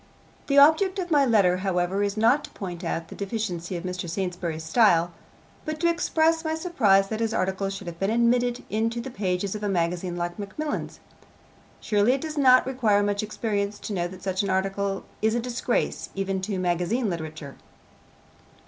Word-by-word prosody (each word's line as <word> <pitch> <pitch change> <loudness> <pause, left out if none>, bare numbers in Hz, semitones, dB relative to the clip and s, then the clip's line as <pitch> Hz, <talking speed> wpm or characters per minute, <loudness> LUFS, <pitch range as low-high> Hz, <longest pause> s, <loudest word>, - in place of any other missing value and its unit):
The 280 - +2
object 320 +7 +6
of 355 -2 -3
my 285 -3 +4
letter, 195 -6 +4
however, 185 0 0
is 205 +1 -1
not 240 +7 +3
to - - -14
point 180 -2 -7
out 165 -1 -3
the - - -9
deficiencies 195 -4 -3
of 170 - -7
Mr. 180 -1 -4
Saintsbury's 175 -3 -3
style, 170 -2 +3 0.5
but 310 0 -4
to 340 - +2
express 325 -1 +1
my 315 0 -1
surprise 215 - +2
that 220 - -3
his 225 -1 -1
article 190 +1 -1
should 195 0 -6
have 170 -1 -7
been 195 - 0
admitted 240 +1 +2
into 225 +2 0
the 255 +3 -6
pages 190 -2 -2
of 210 - -5
a 205 - -1
magazine 175 0 -1
like 175 +2 -4
Macmillan's. 290 +10 -4 0.8
Surely 210 +3 +3
it 270 - -2
does 315 -1 -5
not 255 -3 +5
require 230 -6 +2
much 205 0 0
experience 210 -1 -2
to 210 - -6
know 175 -2 -1
that 185 0 -12
such 190 -1 0
an 200 - -2
article 195 +1 -1 0.2
is 220 +1 +2
a - - +1
disgrace 240 +1 -2
even 195 -1 -2
to 195 0 -3
magazine 180 +7 0
literature. 155 -5 -5
200 Hz, 185 wpm, -25 LUFS, 180-240 Hz, 0.8 s, object